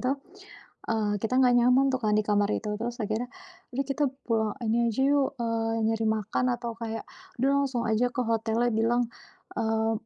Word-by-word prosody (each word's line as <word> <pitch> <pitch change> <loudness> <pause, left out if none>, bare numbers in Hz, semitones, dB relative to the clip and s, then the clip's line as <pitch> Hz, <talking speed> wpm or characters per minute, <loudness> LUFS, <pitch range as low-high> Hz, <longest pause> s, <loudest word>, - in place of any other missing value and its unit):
itu, 255 +1 +1 0.8
eee, 210 -2 0
kita 255 - 0
enggak 250 -1 +5
nyaman 250 +3 +5
tuh 260 - 0
kan 210 - +2
di - - +4
kamar 205 -1 +2
itu, 215 - -3
terus 240 +1 -3
akhirnya, 220 +4 -2 0.5
udah 275 +1 0
kita 290 +2 +1 0.2
pulang, 220 -3 +1
ini 230 +1 +2
aja 265 - 0
yuk, 285 -1 +2
eee, 230 -1 0 0.2
nyari 225 0 0
makan 220 +3 0
atau 235 -1 -4
kayak, 225 -1 -5 0.4
udah 270 - +3
langsung 255 -3 -2
aja 230 +3 +2
ke - - -11
hotelnya 225 +1 +1
bilang, 235 +2 +2 0.5
eee, 225 0 +1
230 Hz, 180 wpm, -27 LUFS, 220-245 Hz, 0.8 s, enggak